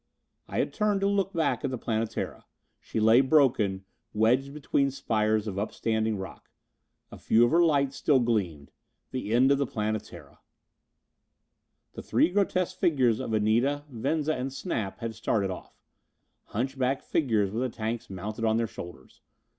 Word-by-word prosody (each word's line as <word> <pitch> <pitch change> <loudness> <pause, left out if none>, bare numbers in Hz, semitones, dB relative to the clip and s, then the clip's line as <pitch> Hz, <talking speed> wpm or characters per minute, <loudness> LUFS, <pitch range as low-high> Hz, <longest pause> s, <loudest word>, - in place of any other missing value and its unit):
I - - -5
had - - 0
turned 210 -2 +1
to 195 - +2
look 200 -1 +1
back 165 -5 0
at - - 0
the 130 - -3
Planetara. 115 -1 -3 0.3
She - - -4
lay 110 +3 +6
broken, 120 -10 +2 0.3
wedged 125 +6 +2
between 140 -1 0
spires 110 -5 0
of 100 -3 -3
upstanding 110 0 -1
rock. 95 0 -9 0.6
A - - -10
few 115 +2 +4
of 120 - 0
her 170 - +5
lights 140 -4 +2
still 140 -3 +3
gleamed. 95 - -1 0.4
The 130 -5 -4
end 130 +4 +4
of 140 - +3
the 140 - 0
Planetara! 110 -1 -5 1.5
The - - -7
three - - +2
grotesque 185 -1 0
figures 130 -8 +2
of 130 - -4
Anita, 115 +7 +1
Venza 145 +6 -1
and 130 +1 -3
Snap 115 - -4
had 115 -1 -3
started 105 -3 -1
off. 90 - -10 0.7
Hunchback 130 +3 -2
figures 110 -10 +1
with 115 +4 -2
the 130 - 0
tanks 115 0 -4
mounted 105 +4 -5
on 110 0 +2
their 115 - +1
shoulders. 85 -10 -11
120 Hz, 155 wpm, -28 LUFS, 110-140 Hz, 1.5 s, lay